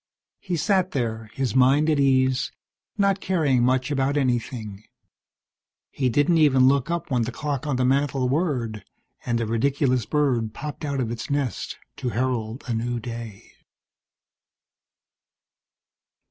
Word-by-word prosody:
He 180 -3 -3
sat 185 +2 +1
there, 110 -4 -2
his 130 -4 -2
mind 135 +4 +4
at 155 -2 +2
ease, 130 -1 +2 0.5
not 200 -1 +2
caring 150 -9 +2
much 130 +2 +1
about 140 +1 +1
anything. 115 -5 -2 1.1
He 130 -2 0
didn't 145 +7 +3
even 135 -4 +5
look 140 +1 +2
up 170 -2 -3
when 125 -2 +2
the 115 +2 -2
clock 145 +2 -3
on 145 - 0
the 125 0 +1
mantel 135 0 +1
whirred, 125 - -1 0.4
and 120 -1 +1
the 115 - -1
ridiculous 125 +1 +1
bird 130 -7 0
popped 150 +1 -6
out 140 -2 -1
of 115 -2 -2
its 115 -1 -5
nest 140 -4 -2 0.2
to 135 -3 -2
herald 120 -1 -2
a 125 - -2
new 120 +1 -2
day. 115 -3 -8
130 Hz, 140 wpm, -24 LUFS, 120-145 Hz, 1.1 s, even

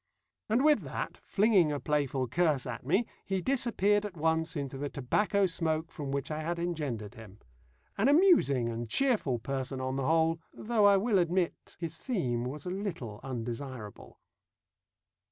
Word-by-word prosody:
And 240 +6 +3
with 300 -1 +6
that, - - -5
flinging 195 -6 +3
a 145 - -2
playful 140 -4 0
curse 150 0 +1
at 120 -2 -5
me, 190 - +2 0.2
he 195 -1 -1
disappeared 210 -3 +1
at 200 -4 -6
once 160 +1 0
into 140 -3 -4
the 145 0 -3
tobacco 200 - +1
smoke 165 -2 -1
from 145 -3 -6
which 140 +2 -2
I 155 0 -2
had 170 +2 -2
engendered 145 -12 -3
him. 110 -3 -12 0.6
An 220 - +4
amusing 285 - +5
and 115 0 -4
cheerful 225 - +2
person 135 +2 -3
on 130 +1 -2
the 135 -1 -1
whole, 165 0 +3 0.2
though 220 -2 +1
I 200 -1 +6
will 205 0 +2
admit 175 0 -1
his 165 -2 -5
theme 125 - -1
was 140 +3 -5
a 180 - -3
little 170 - -5
undesirable. 120 -3 -6
160 Hz, 160 wpm, -30 LUFS, 130-195 Hz, 0.6 s, with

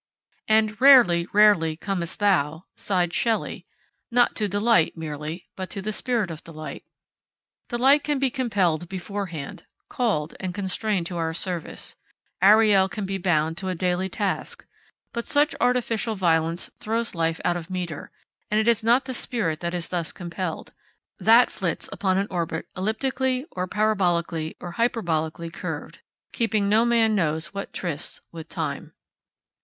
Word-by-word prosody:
And 215 +1 +2
'rarely, 235 -11 +7
rarely 200 -7 +4
comest 175 -1 -3
thou,' 170 -5 +1
sighed 180 -3 0
Shelley, 230 -2 -1 0.4
not 240 -1 +3
to 210 - +1
Delight 205 -4 +2
merely, 155 +2 -6
but 185 -1 -5
to - - -6
the 215 +2 -3
Spirit 230 -6 0
of 160 0 -8
Delight. 155 -2 -8 0.9
Delight 270 +4 +4
can 295 -1 0
be 270 -1 +1
compelled 190 - 0
beforehand, 185 -5 -6 0.2
called, 185 -11 -1
and 185 -1 -4
constrained 200 -1 -1
to 175 0 -5
our 165 -1 -2
service 175 -2 -4 0.5
Ariel 205 -1 +6
can 205 +1 -4
be 195 0 -3
bound 160 -2 +1
to 190 - -5
a 185 - -1
daily 180 +2 0
task; 200 +1 -3 0.5
but 235 0 -4
such 295 +1 +3
artificial 235 -3 +1
violence 165 -2 +1
throws 230 +2 -2
life 165 -1 0
out 175 - +2
of 175 0 -6
metre, 175 -5 -5 0.4
and 210 - +2
it 220 - 0
is 230 -1 +3
not 240 +4 +4
the 260 - -4
spirit 195 -10 -1
that 170 0 -3
is 175 -1 -4
thus 170 -3 -2
compelled. 175 -1 -5 0.5
That 230 +3 +6
flits 175 -5 -2
upon 190 -2 0
an 195 - +1
orbit 170 -2 -2
elliptically 255 +6 -1
or 180 0 -3
parabolically 175 -6 0
or 175 - -7
hyperbolically 170 -7 -1
curved, 190 - -6 0.3
keeping 220 -4 +1
no 220 +3 +4
man 230 -2 +3
knows 160 -4 -1
what 200 0 -5
trysts 170 -4 -4
with 165 -1 -9
Time. 150 -4 -4
190 Hz, 150 wpm, -24 LUFS, 170-220 Hz, 0.9 s, rarely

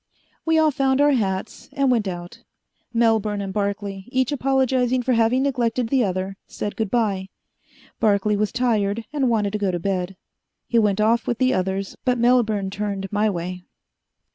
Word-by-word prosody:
We 325 0 +4
all 315 -1 +4
found 270 -1 +1
our 290 0 +5
hats 200 -5 -2
and 275 -2 +2
went 225 -5 +1
out. 175 -1 -7 0.5
Melbourne 220 -3 +2
and 195 -1 -4
Barclay, 200 -1 -3
each 260 +1 0
apologizing 260 -2 +1
for 255 +1 +1
having 230 +3 +3
neglected 245 -3 0
the 265 -1 +3
other, 190 0 -2
said 205 - -5
good 220 -3 -2
bye. 200 -5 0 0.7
Barclay 210 -1 +2
was 210 0 0
tired 225 -3 0
and 275 -4 +1
wanted 210 -3 0
to 210 - -1
go 200 -2 0
to 180 - -1
bed. 185 +1 -2 0.5
He 235 - +2
went 210 -2 +2
off 225 +2 +2
with 240 - 0
the 255 +1 +2
others, 190 +1 -2
but 250 -2 +1
Melbourne 225 -5 +2
turned 200 -1 -4
my 210 +1 +2
way. 180 -1 -4
215 Hz, 170 wpm, -22 LUFS, 195-250 Hz, 0.7 s, our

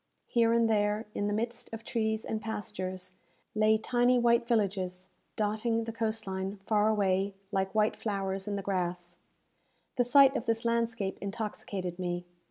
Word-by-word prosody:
Here 230 -2 +3
and 230 0 +4
there, 210 0 +1
in 205 - -1
the 205 - 0
midst 235 +2 -3
of 225 0 -7
trees 220 -3 -1
and 220 -1 -3
pastures, 185 -4 -5 0.4
lay 215 0 +4
tiny 245 +3 +3
white 235 0 +3
villages, 190 -5 0 0.3
dotting 220 +2 0
the 225 - -4
coast 225 -1 -2
line 190 +1 -3
far 210 -1 +3
away, 195 -2 +1 0.2
like 190 +1 -1
white 215 0 +3
flowers 195 -2 -3
in 205 - -1
the 200 - -3
grass. 175 -2 -3 0.8
The 245 - +4
sight 270 +2 +6
of 255 - -2
this 230 0 0
landscape 230 -4 0
intoxicated 195 -3 -4
me. 175 -1 -2
215 Hz, 160 wpm, -30 LUFS, 190-230 Hz, 0.8 s, sight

